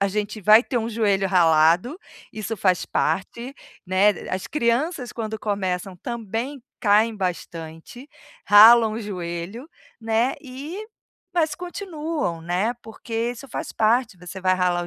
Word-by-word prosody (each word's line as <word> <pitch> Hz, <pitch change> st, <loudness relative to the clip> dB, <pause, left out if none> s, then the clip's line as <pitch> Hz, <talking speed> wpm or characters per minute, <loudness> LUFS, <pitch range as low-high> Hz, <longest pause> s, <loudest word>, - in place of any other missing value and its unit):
a 200 Hz, -, +2 dB
gente 210 Hz, +2 st, -3 dB
vai 215 Hz, +3 st, +7 dB
ter 255 Hz, -, -3 dB
um 225 Hz, 0 st, -3 dB
joelho 205 Hz, -4 st, +1 dB
ralado, 170 Hz, -, +3 dB, 0.4 s
isso 220 Hz, +1 st, -4 dB
faz 185 Hz, -2 st, +1 dB
parte, 235 Hz, -, -2 dB, 0.3 s
né. 185 Hz, +3 st, +4 dB, 0.2 s
As 185 Hz, 0 st, -3 dB
crianças 250 Hz, +1 st, -1 dB
quando 220 Hz, -1 st, -5 dB
começam, 190 Hz, -3 st, -2 dB
também 235 Hz, +5 st, -5 dB, 0.2 s
caem 215 Hz, +2 st, +3 dB
bastante, 170 Hz, -, -6 dB, 0.4 s
ralam 220 Hz, +1 st, +8 dB
o 225 Hz, -, -4 dB
joelho, 185 Hz, -, -6 dB, 0.3 s
né, 225 Hz, +3 st, +1 dB
e 280 Hz, +6 st, -8 dB, 0.6 s
mas 315 Hz, -3 st, +1 dB
continuam, 325 Hz, -, -4 dB
né, 180 Hz, +8 st, -1 dB
porque 225 Hz, +1 st, -4 dB
isso 245 Hz, +3 st, -11 dB
faz -, -, -5 dB
parte, 225 Hz, -1 st, +1 dB
você 180 Hz, +2 st, -9 dB
vai 185 Hz, 0 st, +2 dB
ralar 180 Hz, -1 st, +1 dB
você -, -, -6 dB
215 Hz, 135 wpm, -23 LUFS, 185-240 Hz, 0.6 s, ralam